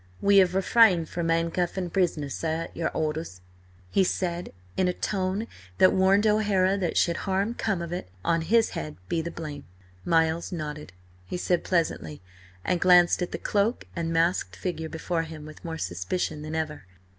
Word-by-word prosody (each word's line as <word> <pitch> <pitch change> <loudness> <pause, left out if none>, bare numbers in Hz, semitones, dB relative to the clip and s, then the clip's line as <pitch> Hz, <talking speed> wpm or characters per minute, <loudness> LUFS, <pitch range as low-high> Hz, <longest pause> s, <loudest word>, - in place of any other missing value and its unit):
"We 200 0 +6
'ave 180 -1 +2
refrained 190 -4 +4
from 170 -1 -2
'andcuffin' 170 +2 0
pris'ner, 160 -7 0
sir, 160 +2 -2
at - - -11
your 165 - -1
horders," 155 - -3 0.5
he 195 - +4
said, 175 -1 -2 0.2
in 185 - +2
a 180 - +1
tone 190 +3 -1 0.3
that 185 - +6
warned 195 +2 +4
O'Hara 205 -3 +3
that 175 -4 -1
should 170 -1 +2
harm 195 +3 -1
come 205 -7 -1
of 170 0 -5
it, 175 - -5 0.2
on 165 0 +2
his 225 +7 +3
head 75 0 -5
be 165 - 0
the 170 - -4
blame. 150 -4 -7 0.4
Miles 165 +1 +1
nodded. 150 -3 -5
"Quite - - -16 0.2
right," 90 0 -28
he - - -2
said 175 -1 0
pleasantly, 160 - -1 0.5
and 180 -1 0
glanced 180 0 +5
at 180 - -2
the - - -3
cloaked 210 +4 0
and 165 -1 -2
masked 165 - +1
figure 160 - -4
before 165 +1 -2
him 160 -2 -8
with 155 0 -12
more 165 -2 -4
suspicion 150 - -3
than 155 +1 -5
ever. 155 -8 -3
170 Hz, 180 wpm, -26 LUFS, 160-185 Hz, 0.5 s, We